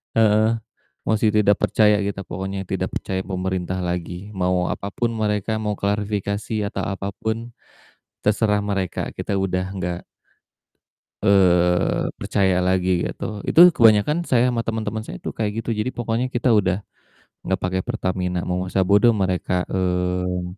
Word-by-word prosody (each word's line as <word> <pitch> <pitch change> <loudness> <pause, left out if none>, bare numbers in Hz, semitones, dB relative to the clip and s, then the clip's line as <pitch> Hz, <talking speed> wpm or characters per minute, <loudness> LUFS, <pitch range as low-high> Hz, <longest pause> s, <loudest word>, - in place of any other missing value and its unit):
Heeh, 110 +1 +3 0.5
mosi 110 -1 +2
tidak 105 -1 +4
percaya 105 -1 +3
kita 100 -1 -2
pokoknya, 95 0 -5
tidak - - -2
percaya 95 0 -3
pemerintah 95 -1 -2
lagi, 90 +2 -4
mau 90 -2 0
apapun 100 +4 -2
mereka, 110 -1 -1
mau 105 -1 -2
klarifikasi 100 +1 -2
atau - - -4
apapun, 110 +4 -4 0.7
terserah 105 0 +2
mereka, 100 -3 -2
kita - - -3
udah 90 -1 -1 0.2
gak 90 0 -3 1.2
eee, 90 -3 +3
percaya 95 -3 +1
lagi 95 0 +1 0.2
gitu. 105 -2 -5
Itu 175 +2 +8
kebanyakan 115 +7 +5
saya 125 0 +3
ama 115 - -1
temen-temen 110 -1 -2
saya - - -6
tuh - - -2
kayak 110 +1 -2
gitu, - - -5
jadi 105 - -1
pokoknya 120 +1 -1
kita 120 +1 +2
udah 95 -4 +3 0.7
gak 95 -1 0
pake 95 +1 0
Pertamina. 90 -5 -2
Mau 90 +1 -2
masa 95 +1 +1
bodoh 105 +5 +5
mereka, 90 -2 0
eee, 90 -1 -1
100 Hz, 135 wpm, -22 LUFS, 90-110 Hz, 1.2 s, Itu